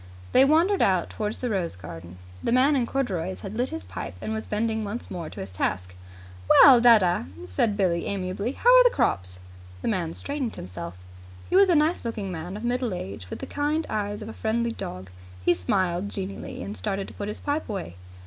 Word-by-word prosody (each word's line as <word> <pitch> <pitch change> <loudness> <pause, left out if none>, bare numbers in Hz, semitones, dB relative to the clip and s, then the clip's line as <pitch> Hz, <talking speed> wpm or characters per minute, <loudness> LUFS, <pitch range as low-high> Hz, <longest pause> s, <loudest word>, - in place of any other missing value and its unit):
They 260 - +7
wandered 335 +7 +3
out 185 -3 +2
towards 210 0 -3
the 250 - -3
rose 180 - -1
garden. 85 0 -10 0.3
The - - 0
man 265 +4 +4
in 245 -3 +1
corduroys 180 - -2
had 205 - -6
lit 245 +3 0
his 110 - -6
pipe 90 -1 -7
and 220 - -4
was 220 0 -4
bending 220 +1 -1
once 210 +4 -4
more 170 -4 -5
to - - -10
his 95 0 -7
task. 90 0 -2 0.6
"Well, 255 -4 +9
dadda," 210 - +5 0.2
said 200 - 0
Billie 175 -4 +1
amiably, 200 +5 -2
"how - - +5
are - - +9
the - - +6
crops?" 90 - 0 0.4
The - - -1
man 175 -7 -1
straightened 280 -5 -3
himself. 90 -1 -7 0.5
He - - +2
was 390 0 +6
a 350 - +5
nice 310 +3 +2
looking 220 -5 -4
man 175 +3 -5
of 215 - -8
middle 245 -4 -1
age, 95 - -7
with - - -5
the - - -3
kind 300 +2 -1
eyes 205 0 -2
of - - -8
a - - -7
friendly 230 +1 -1
dog. 95 - -7 0.3
He - - +5
smiled 175 - 0
genially, 195 -1 -5
and 205 - -6
started 195 -2 -3
to - - -12
put 205 - -5
his 210 - -5
pipe 290 -1 -2
away. 190 - -5
205 Hz, 205 wpm, -26 LUFS, 165-245 Hz, 0.6 s, Well